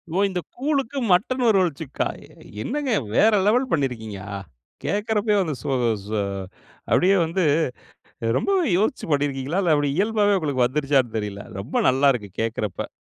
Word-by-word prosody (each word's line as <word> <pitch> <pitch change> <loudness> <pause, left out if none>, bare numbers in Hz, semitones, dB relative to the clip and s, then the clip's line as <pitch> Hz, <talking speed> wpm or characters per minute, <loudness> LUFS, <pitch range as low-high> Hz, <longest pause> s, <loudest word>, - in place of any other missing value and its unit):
ஓ, - - +1
இந்த 180 -1 -3 0.2
கூழுக்கு 275 -1 -1
மட்டன் 230 +9 +2
ஒரு 215 -3 +5
வறுவல்ச்சுக்கா, 160 -5 -1 0.2
எ - - -20 0.3
என்னங்க 285 - -2 0.2
வேற 220 +1 +5 0.2
லெவல் 250 +5 +3
பண்ணியிருக்கீங்க? 115 -9 -2
அ. 100 - -3 0.5
கேக்கிறப்பயே 210 0 +1
வந்து 160 -6 -2
சு 150 - -7 0.4
சு 105 +1 -2 0.7
அப்டியே 190 +2 +4
வந்து, 170 +3 -1 0.9
ரொம்பவே 385 -4 +1
யோசிச்சு 215 +6 0
பண்ணியிருக்கீங்களா? 145 +3 0
இல்ல 165 -3 +3
அப்டி 145 -1 +1
இயல்பாவே 205 0 +2
உங்களுக்கு 140 -6 +1
வந்துருச்சான்னு 135 -3 +1
தெரியல. 100 -1 -4 0.2
ரொம்ப 100 - -7
நல்லா 135 +2 +4
இருக்கு. 105 -5 -5
கேக்கிறப்ப. 110 -3 -3
160 Hz, 145 wpm, -23 LUFS, 130-210 Hz, 0.9 s, ஒரு